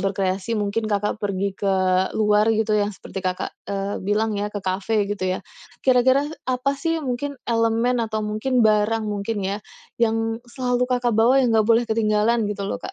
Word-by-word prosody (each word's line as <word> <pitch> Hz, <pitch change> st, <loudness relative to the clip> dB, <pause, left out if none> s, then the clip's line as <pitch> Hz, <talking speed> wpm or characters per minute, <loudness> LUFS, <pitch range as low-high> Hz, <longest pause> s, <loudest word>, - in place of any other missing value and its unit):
berkreasi, 195 Hz, +2 st, -1 dB
mungkin 210 Hz, +2 st, -1 dB
Kakak 210 Hz, +1 st, -1 dB
pergi 200 Hz, -1 st, -1 dB
ke 195 Hz, 0 st, 0 dB, 0.4 s
luar, 210 Hz, 0 st, +3 dB
gitu. 220 Hz, 0 st, 0 dB
Yang 205 Hz, -1 st, 0 dB
seperti 195 Hz, -, -7 dB
Kakak, 180 Hz, 0 st, -2 dB, 0.2 s
eee, 200 Hz, 0 st, -2 dB
bilang 215 Hz, +2 st, +1 dB
ya 205 Hz, +1 st, -1 dB
ke 205 Hz, -, -2 dB
kafe 200 Hz, +3 st, 0 dB
gitu 205 Hz, -2 st, -2 dB
ya. 185 Hz, 0 st, 0 dB, 0.5 s
Kira-kira 260 Hz, +2 st, +4 dB, 0.2 s
apa 255 Hz, +2 st, +1 dB
sih 325 Hz, +1 st, -1 dB
mungkin 275 Hz, +2 st, -3 dB
elemen 230 Hz, +1 st, +1 dB
atau 220 Hz, -1 st, -2 dB
mungkin 230 Hz, +4 st, 0 dB
barang 215 Hz, +1 st, +3 dB
mungkin 205 Hz, 0 st, -3 dB
ya, 195 Hz, +2 st, -1 dB, 0.4 s
yang 225 Hz, 0 st, +1 dB
selalu 250 Hz, -1 st, 0 dB
Kakak 245 Hz, -2 st, +1 dB
bawa, 245 Hz, +5 st, +4 dB
yang 245 Hz, -, +2 dB
nggak 220 Hz, -1 st, +3 dB
boleh 230 Hz, +1 st, +4 dB
ketinggalan, 220 Hz, 0 st, +2 dB
gitu 205 Hz, -1 st, -4 dB
loh, -, -, -3 dB
Kak? -, -, -7 dB
220 Hz, 175 wpm, -23 LUFS, 205-240 Hz, 0.5 s, Kira-kira